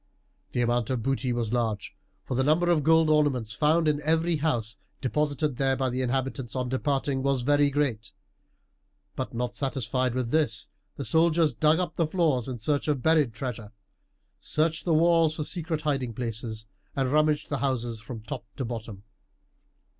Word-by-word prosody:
The 120 - +1
amount 120 -1 +1
of 125 -4 -1
booty 135 0 0
was 120 -2 -1
large, 110 -4 -1 0.3
for - - -5
the 130 +2 +1
number 165 +5 +3
of 160 -3 +3
gold 160 +1 +5
ornaments 145 -8 +2
found 155 +5 +2
in 150 -1 +1
every 160 +2 +1
house, 120 -7 -1 0.2
deposited 145 0 -1
there 135 -1 +2
by 130 -1 -1
the 130 +1 -1
inhabitants 130 -1 -2
on 125 -1 -1
departing, 135 0 0
was 135 -2 0
very 145 +2 +4
great; 125 -8 -1 1.0
but - - -4
not 125 +1 -2
satisfied 130 -2 -1
with 125 -2 -2
this 145 -8 0 0.3
the 140 - -4
soldiers 160 -2 +3
dug 155 +7 +3
up 175 -2 -3
the 165 - +2
floors 155 -8 +1
in 130 -2 -4
search 145 +7 -1
of 145 -4 0
buried 155 -6 +4
treasure, 110 -2 -6 0.7
searched 160 +1 -1
the 170 - +2
walls 165 -1 +4
for 155 - -2
secret 165 -1 -3
hiding 135 -6 -1
places, 110 -2 -4 0.3
and 135 -2 0
rummaged 150 0 +2
the 145 - -1
houses 120 -4 -1
from 115 -1 -8
top 110 - -6
to 130 - -3
bottom. 110 -4 -6
135 Hz, 170 wpm, -27 LUFS, 120-155 Hz, 1.0 s, gold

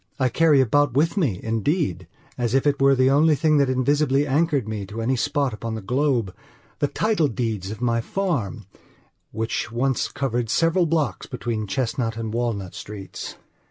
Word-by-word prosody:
I 130 -1 +2
carry 155 -1 +4
about 145 +2 +2
with 160 +6 +2
me, 135 - 0
indeedas 110 - -1 0.5
if 135 - +2
it 145 -1 +1
were 135 0 +5
the 130 +1 +3
only 150 +2 +4
thing 155 +1 +2
that 140 -2 +3
invisibly 140 +2 +2
anchored 145 -3 +1
me 110 -2 -4
to 105 +4 -7
any 120 +4 +1
spot 135 +1 0
upon 110 +1 -5
the 110 - -5
globethe 125 -5 0 0.6
title 210 -8 +2
deeds 110 -6 -3
of 110 +3 -7
my 115 -1 +1
farm, 125 - -2 0.7
which 110 0 -3
once 130 +2 0
covered 120 -4 -2
several 165 +6 +2
blocks 160 -2 -1
between 115 -4 -3
Chestnut 115 0 -2
and 110 -1 -4
Walnut 115 -6 -2
Streets. 100 -2 -8
130 Hz, 160 wpm, -23 LUFS, 115-145 Hz, 0.7 s, were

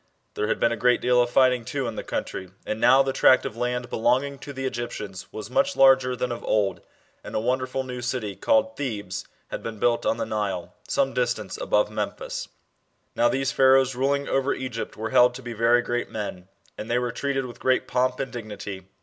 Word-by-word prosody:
There 105 - -1
had - - 0
been 115 - +3
a - - 0
great 125 0 +4
deal 125 0 +3
of 120 - +1
fighting, 125 -1 +3
too, 135 +3 -3
in 115 - -4
the - - -3
country, 95 - -4 0.2
and 110 - -3
now 135 +1 +6
the 135 0 -2
tract 130 - +5
of - - -4
land 125 +1 -2
belonging 130 +5 +1
to 145 - -8
the 135 -1 -5
Egyptians 105 -7 -5
was 110 +1 -7
much 185 +6 +2
larger 130 -1 +5
than 125 0 -2
of 120 - -5
old, 100 -4 +1 0.4
and - - -8
a - - +2
wonderful 130 +3 -1
new 125 -1 -6
city 120 -5 -3
tailed 275 0 +2
Thebes 105 -8 -4 0.2
had - - -5
been 115 -1 -6
built 120 +2 +1
on - - +1
the - - -2
Nile, 95 -5 -3
some 275 -1 +1
distance - - -1
above - - +1
Memphis. - - -4 0.7
Now 300 0 +4
these 135 - 0
Pharaohs 135 0 +5
ruling 140 +3 0
over 135 +1 +1
Egypt 125 -3 -5
were 110 +1 -4
held 125 0 +5
to 130 - -9
be 120 -1 -5
very 115 +2 +3
great 120 0 -2
men, 100 -4 -5 0.3
and 110 - -6
they 120 - +2
were 125 -1 -1
treated 135 +1 -2
with 120 - -10
great 130 0 +1
pomp 130 0 0
and 135 -1 -4
dignity. 105 -4 -7
125 Hz, 210 wpm, -25 LUFS, 110-135 Hz, 0.7 s, now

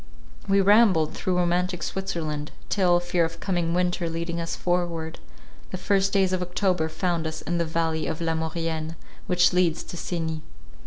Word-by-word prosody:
We 195 0 +5
rambled 195 -6 +5
through 185 -1 -1
romantic 180 0 +1
Switzerland; 160 -6 -3 0.2
till, 180 -3 +3
fear 175 0 +1
of 165 0 -3
coming 175 -3 0
winter 180 -1 0
leading 170 +1 -3
us 165 - -3
forward, 170 -2 -1 0.5
the - - -4
first 195 +1 +2
days 190 -2 +2
of 185 - 0
October 180 -2 0
found 165 0 -1
us 160 0 -6
in 175 0 -1
the 170 - +1
valley 160 -1 -1
of 160 - -3
La 165 -1 0
Maurienne, 160 0 -2 0.3
which 180 -2 +4
leads 175 -3 +2
to 175 - -8
Cenis. 160 -2 -3
175 Hz, 165 wpm, -25 LUFS, 165-180 Hz, 0.5 s, We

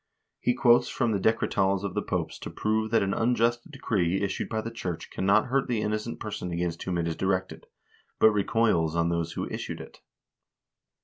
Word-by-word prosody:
He 125 - +1
quotes 120 -1 +4
from 120 -3 0
the 100 - +1
Decretals 100 -2 +1
of 100 -2 -3
the 105 - 0
Popes 90 -5 -3
to - - -6
prove 110 0 -1
that 115 -2 +3
an 95 0 0
unjust 120 +1 +1
decree 95 - 0
issued 100 -1 -2
by 110 -1 -1
the 115 - -5
church 90 -7 -5
cannot 100 +3 +3
hurt 135 +1 0
the 115 -3 0
innocent 110 +2 -2
person 105 -4 -5
against 85 -1 -2
whom 90 -2 -2
it 85 -1 0
is 80 - -2
directed, 95 +1 -2 0.5
but 110 - +6
recoils 100 -6 +1
on 85 0 +2
those 85 -1 -1
who - - -3
issued - - -5
it. - - -11
105 Hz, 190 wpm, -27 LUFS, 90-115 Hz, 0.5 s, but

